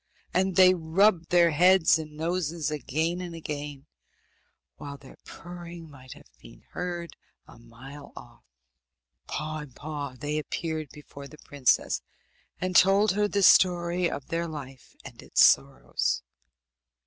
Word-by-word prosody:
And 190 0 +1
they 185 0 +7
rubbed 170 +1 +2
their 170 -1 +4
heads 180 +1 +4
and 155 -1 -9
their 160 - -2
noses 170 -3 -2
again 160 +4 -2
and 175 -2 -7
again, 145 -3 -7 0.9
while 140 -1 -8
their 135 -1 -15
purring 170 -2 -10
might 130 -2 -12
have - - -17
been - - -16
heard 175 -1 -5 0.3
a - - -16
mile 125 +5 -13
off. - - -13 0.9
Paw 155 +1 -4
in 150 -4 -10
paw 145 -1 -6
they 150 +1 -2
appeared 155 -1 -4
before 140 -1 -12
the 155 - -15
princess, 140 -4 +1 0.6
and 185 0 -3
told 195 +3 +5
her 205 +2 +1
the 200 -1 0
story 175 -1 +4
of 140 - -6
their 170 0 -2
life 135 -5 -10
and - - -11
its - - +4
sorrows. 65 -3 +1
160 Hz, 140 wpm, -27 LUFS, 145-175 Hz, 0.9 s, they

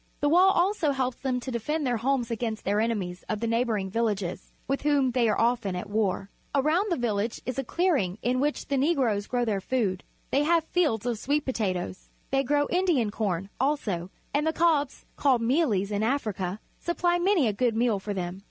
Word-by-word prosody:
The 290 - +2
wall 360 +4 +6
also 355 -5 +2
helps 260 -2 -1
them 255 -2 -1
to 260 - -5
defend 295 +6 -2
their 245 -2 +1
homes 245 0 0
against 225 -1 -3
their 205 +2 +1
enemies 195 -6 -2
of 215 - -1
the 230 - -2
neighbouring 230 -4 0
villages, 205 -5 -2 0.2
with 275 +1 -1
whom 285 -3 +2
they 235 -2 +2
are 210 - +1
often 230 -5 +1
at 180 +3 -6
war. 200 -2 0 0.2
Around 310 +9 +2
the 340 - +1
village 225 -2 -1
a 255 +2 -2
clearing 280 - +1
is 205 - -15
made 245 - +2
in 255 - +1
which 295 +2 -1
the 280 - +1
Negroes 260 -9 +1
grow 245 -1 0
their 205 -4 -1
food. 200 -6 -1 0.3
They 275 - +3
have 330 +2 +3
fields 310 - 0
of 240 -3 -1
sweet 290 +4 0
potatoes. 185 -7 -3 0.2
They 270 0 +3
grow 290 +2 +2
Indian 345 - +2
corn, 195 -3 -2
also, 220 - -1 0.2
and 295 +2 +1
the 320 - +1
cobs, 310 -4 +1
called 260 -5 +3
mealies 230 - +1
in 205 0 0
Africa, 215 -6 -1 0.2
supply 345 0 +1
many 350 - +3
a 215 - +1
good 235 +1 +1
meal 225 -3 +2
for 205 +1 -4
them. 180 0 -4
245 Hz, 200 wpm, -27 LUFS, 210-290 Hz, 0.3 s, wall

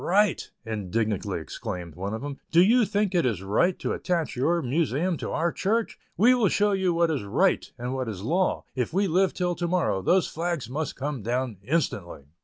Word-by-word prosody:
"Right!" 200 +1 +2 0.2
indignantly 105 -2 -2
exclaimed 90 -1 -6
one 100 +5 -4
of 110 - -6
them, 145 -1 -5
"do 170 - +4
you 230 +4 +5
think 205 -1 0
it 175 - +3
is 110 -7 -1
right 110 - +2
to - - -2
attach 170 -4 -1
your 165 +7 +1
Museum 155 +5 0
to - - -5
our 170 +2 0
Church? 220 +6 -1 0.2
We 240 +5 +6
will 235 -6 +3
show 205 0 +2
you 190 -2 +1
what 170 -1 +2
is 145 - -1
'right' 140 - +1
and 125 +1 -4
what 130 -3 -2
is 100 -3 -6
law, 175 - +1
if 125 0 -2
we 195 +3 +2
live 185 +2 +3
till 180 -1 0
to 175 0 -2
morrow; 170 - +1
those 180 - +3
flags 170 -6 -3
must 145 +5 -3
come 140 -2 -3
down 120 0 -2
instantly." 100 - -2
155 Hz, 205 wpm, -26 LUFS, 115-180 Hz, 0.2 s, We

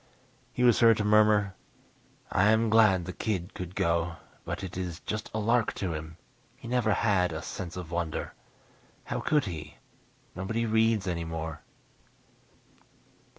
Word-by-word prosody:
He 125 - -1
was 120 -3 +5
heard 115 -2 +6
to 105 - 0
murmur, 105 -1 +4 0.8
"I 95 - +3
am 110 0 +3
glad 105 -6 +5
the 90 - -5
kid 95 -4 -3
could 90 0 -7
go, 85 0 0 0.3
but - - -4
it 90 -2 -6
is 90 -3 -4
just 110 +2 -4
a - - -3
lark 115 +1 +2
to 90 -4 -2
him. 80 +1 -7 0.4
He - - -11
never 120 -2 +1
had 95 -4 +2
a 80 -2 -5
'sense 90 -1 -6
of 90 -3 -7
wonder.' 85 -2 -3 0.7
How - - -3
could 150 -2 +2
he 75 -5 -7 0.6
nobody 110 +5 -2
reads 110 -2 +2
anymore." 80 -2 -4
95 Hz, 150 wpm, -28 LUFS, 85-110 Hz, 0.8 s, heard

